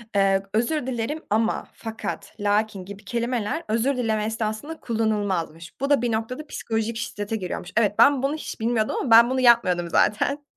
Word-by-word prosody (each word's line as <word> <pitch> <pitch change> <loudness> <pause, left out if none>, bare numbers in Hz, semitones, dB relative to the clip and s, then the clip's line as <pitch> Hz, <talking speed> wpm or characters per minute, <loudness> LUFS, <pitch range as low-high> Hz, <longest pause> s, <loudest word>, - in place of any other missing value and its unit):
Iıı, 195 -1 +3
özür 250 +5 0
dilerim 260 +6 -3
ama, 220 +2 0
fakat, 225 -1 -6
lakin 205 -1 0
gibi 200 +1 -11
kelimeler 240 +4 -2
özür 240 +5 +1
dileme 220 -3 0
esnasında 220 +8 -3
kullanılmazmış. 205 -8 -2
Bu 275 - 0
da 285 -4 +4
bir 240 - 0
noktada 240 +7 -3
psikolojik 225 -2 -3
şiddete 205 -2 -4
giriyormuş. 180 -3 -5
Evet, 210 -3 +3
ben 280 -2 +6
bunu 280 +2 +1
hiç 310 - -7
bilmiyordum 225 -1 0
ama 250 - -3
ben 230 +1 +8
bunu 260 0 0
yapmıyordum 185 -9 +4
zaten 280 - +1
225 Hz, 165 wpm, -24 LUFS, 210-245 Hz, -, ben